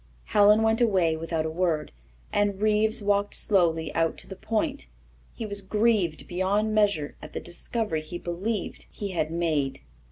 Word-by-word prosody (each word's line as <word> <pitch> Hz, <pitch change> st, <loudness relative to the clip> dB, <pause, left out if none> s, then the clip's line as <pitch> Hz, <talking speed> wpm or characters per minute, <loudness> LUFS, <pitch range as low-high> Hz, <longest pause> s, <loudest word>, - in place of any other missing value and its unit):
Helen 210 Hz, +1 st, +5 dB
went 225 Hz, +1 st, +2 dB
away 185 Hz, -8 st, +3 dB
without 160 Hz, 0 st, -2 dB
a 160 Hz, -, -2 dB
word, 165 Hz, -2 st, 0 dB, 0.4 s
and 205 Hz, -1 st, +1 dB
Reeves 215 Hz, +1 st, +2 dB
walked 200 Hz, 0 st, +1 dB
slowly 165 Hz, -6 st, +1 dB
out 165 Hz, 0 st, +1 dB
to -, -, -7 dB
the 190 Hz, -, -8 dB
Point. 225 Hz, -, -2 dB, 0.5 s
He 230 Hz, -, -5 dB
was 205 Hz, -1 st, -1 dB
grieved 205 Hz, -5 st, +1 dB
beyond 200 Hz, +4 st, 0 dB
measure 200 Hz, -9 st, +1 dB
at -, -, -10 dB
the -, -, -3 dB
discovery 175 Hz, 0 st, -2 dB
he 155 Hz, +3 st, -7 dB
believed 185 Hz, +4 st, -3 dB
he 205 Hz, -, -5 dB
had 165 Hz, -4 st, -1 dB
made. 155 Hz, -5 st, -1 dB
195 Hz, 160 wpm, -26 LUFS, 165-215 Hz, 0.5 s, Helen